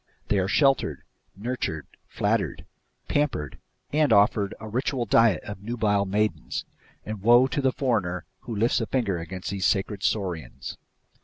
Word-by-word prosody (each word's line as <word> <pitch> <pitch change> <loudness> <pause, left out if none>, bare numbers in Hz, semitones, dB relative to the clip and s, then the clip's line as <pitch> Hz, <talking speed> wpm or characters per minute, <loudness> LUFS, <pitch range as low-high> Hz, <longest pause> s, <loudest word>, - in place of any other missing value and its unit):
They 100 - +3
are 95 - +1
sheltered, 135 +6 +2 0.3
nurtured, 100 - -3 0.2
flattered, - - -1 0.4
pampered, 135 - -1 0.3
and 150 -2 +3
offered 100 -1 +4
a 110 - -8
ritual 125 +2 -1
diet 110 -4 +4
of 105 -2 -7
nubile 105 -2 +1
maidens; 105 +2 -1 0.4
and 110 -2 -5
woe 120 +4 +6
to 130 +2 -1
the 135 -1 +3
foreigner 105 -10 -1
who 115 - -6
lifts 115 +4 +2
a 115 - -2
finger 105 -9 0
against 90 +3 -6
these 95 -2 +1
sacred 100 0 0
saurians. 95 -6 -3
105 Hz, 145 wpm, -26 LUFS, 95-120 Hz, 0.4 s, woe